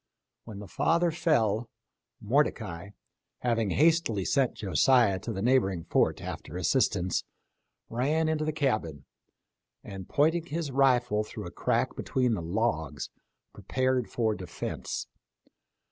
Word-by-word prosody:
When 110 -3 -8
the 100 0 -8
father 170 - +2
fell, 115 - +1 0.5
Mordecai, 85 +4 0 0.5
having 115 -4 +1
hastily 150 - +2
sent 135 -3 +1
Josiah 110 0 +3
to 115 - -5
the 100 -2 -3
neighboring 100 -9 +2
fort - - +1
after - - -6
assistance, 90 +1 +1 0.6
ran 150 +7 0
into 155 -1 0
the 155 - 0
cabin, 110 - -1 0.8
and 95 -3 -8
pointing 160 +3 +2
his 155 -2 -3
rifle 125 -5 +3
through - - -8
a - - -7
crack - - 0
between 125 -3 0
the 100 - -2
logs, 85 - -2 0.4
prepared 130 -2 -1
for 110 -2 0
defense. 90 -3 -5
120 Hz, 120 wpm, -28 LUFS, 100-145 Hz, 0.8 s, Josiah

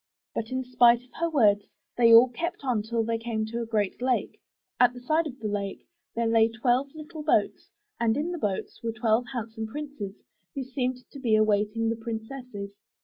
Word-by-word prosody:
But 225 - -3
in 260 0 -2
spite 245 -1 +5
of 250 - -24
her 335 0 +1
words, 210 -9 +3 0.3
they 230 -1 +5
all 230 +3 +9
kept 325 +7 -4
on 250 -5 +1
till 225 +1 -1
they 230 0 -1
came 225 -1 -2
to 230 +2 -4
a 230 - -4
great 215 -1 -1
lake. 255 -1 -1 0.4
At 245 0 +5
the - - -7
side 310 +6 +1
of 265 -3 -8
the 220 - -4
lake 200 -1 -4 0.3
there 230 0 0
lay 225 0 +4
twelve 245 +4 +1
little 310 0 -8
boats 295 -9 +1 0.3
and 230 +1 +2
in 315 +4 -1
the 350 - -4
boats 205 -6 -3
were 230 -1 -2
twelve 225 +1 +1
handsome 225 -3 -4
princes, 260 -6 -6 0.4
who 275 - -2
seemed 255 -1 -3
to 280 - -9
be 235 -5 +2
awaiting 215 +1 +2
the 230 - 0
princesses. 225 -2 -6
235 Hz, 200 wpm, -27 LUFS, 220-255 Hz, 0.4 s, all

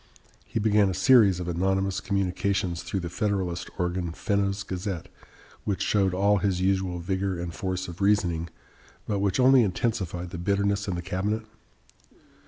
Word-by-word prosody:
He - - -4
began 105 -2 +3
a 95 - -2
series 105 -8 +5
of 90 - -4
anonymous 95 +2 0
communications 95 -2 -1
through 95 - -3
the 85 - -4
Federalist 95 -4 -2
organ, 90 -2 -2
"Fenno's 100 -1 -1
Gazette," 95 -2 -4 0.5
which 100 -3 -1
showed 100 -3 +2
all 100 +2 +3
his 95 -2 0
usual 95 -1 0
vigor 95 +1 -2
and 85 -1 -4
force 95 0 -3
of 85 +2 -9
reasoning, 90 -5 +1 0.6
but 100 -2 0
which 100 +1 0
only 130 0 +6
intensified 95 -4 -1
the 85 - -6
bitterness 100 +2 0
in 95 - -1
the 85 - -4
cabinet. 100 +5 -2
95 Hz, 155 wpm, -26 LUFS, 90-100 Hz, 0.6 s, only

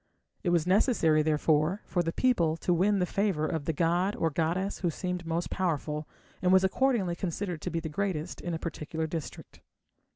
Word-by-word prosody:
It 180 - 0
was 170 -2 +2
necessary, 180 - +3
therefore, 155 +4 +1
for 175 - 0
the 165 -1 -1
people 170 -9 +2
to 175 - +1
win 195 +4 +3
the 180 - +2
favour 190 -5 0
of 160 -3 -2
the 160 - +1
god 175 +5 +1
or 165 - 0
goddess 170 +6 -1
who 175 - 0
seemed 180 +1 -4
most 165 +1 -2
powerful, 150 -4 -1 0.3
and 180 0 +3
was 190 0 +6
accordingly 195 -3 +1
considered 175 -1 -3
to - - -3
be 165 - -1
the 160 - -5
greatest 175 0 -3
in 175 -2 -3
a - - -1
particular 160 -1 -4
district. 160 -3 -7
170 Hz, 190 wpm, -29 LUFS, 160-190 Hz, 0.3 s, was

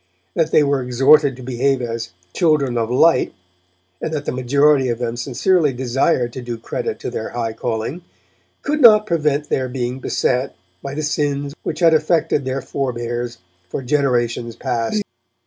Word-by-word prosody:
That 160 -2 +1
they 155 - +4
were 140 -2 +1
exhorted 135 +3 +4
to 130 - -11
behave 130 +2 0
as 115 -1 -4 0.2
'children 150 -7 +2
of 115 -1 0
light', 160 +7 +3 0.7
and - - -3
that 150 -2 -3
the - - -1
majority 135 +2 +3
of 120 - -1
them 120 -1 -3
sincerely 145 +5 +1
desired 125 0 0
to 130 - -6
do 120 -1 -5
credit 115 - -4
to - - -4
their 110 - -4
high 115 -2 -3
calling, 115 +8 -3 0.6
could 300 0 -1
not 215 -3 +8
prevent 150 -5 0
their 130 -1 0
being 125 0 -3
beset 130 0 -1 0.3
by 140 0 -6
the 155 - -3
sins 145 -2 -1
which 155 - -4
had 165 -1 +6
affected 155 -2 +1
their 130 +1 -2
forebears 120 -3 -3 0.3
for 135 - -4
generations 120 -4 0
past. 125 - -1
135 Hz, 165 wpm, -20 LUFS, 120-150 Hz, 0.7 s, not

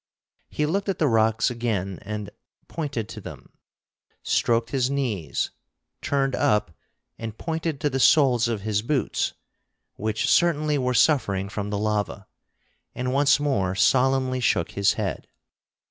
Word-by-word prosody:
He 150 - -1
looked 195 +6 -1
at 195 - -1
the 155 - +2
rocks 110 0 +2
again 105 -6 -2
and 105 0 -6 0.4
pointed, 140 -9 -4
to 110 -1 -8
them, - - -11 0.7
stroked 115 -1 +1
his 130 -1 +1
knees, 120 - -2 0.5
turned 135 -1 0
up 105 -6 +1 0.4
and 115 -1 -6
pointed 160 -3 -3
to 150 - +1
the 135 - -1
soles 130 -5 +4
of 115 -4 -2
his 105 0 0
boots, 130 +4 -1 0.6
which 110 +1 -1
certainly 155 -4 +2
were 125 -1 0
suffering 100 -10 +2
from 105 0 -4
the 105 - -2
lava, 105 -1 -2 0.7
and 125 0 -2
once 145 +1 +4
more 100 -11 0
solemnly 130 +4 +2
shook 95 -8 +1
his 100 0 +2
head. - - -4
120 Hz, 140 wpm, -24 LUFS, 105-140 Hz, 0.7 s, soles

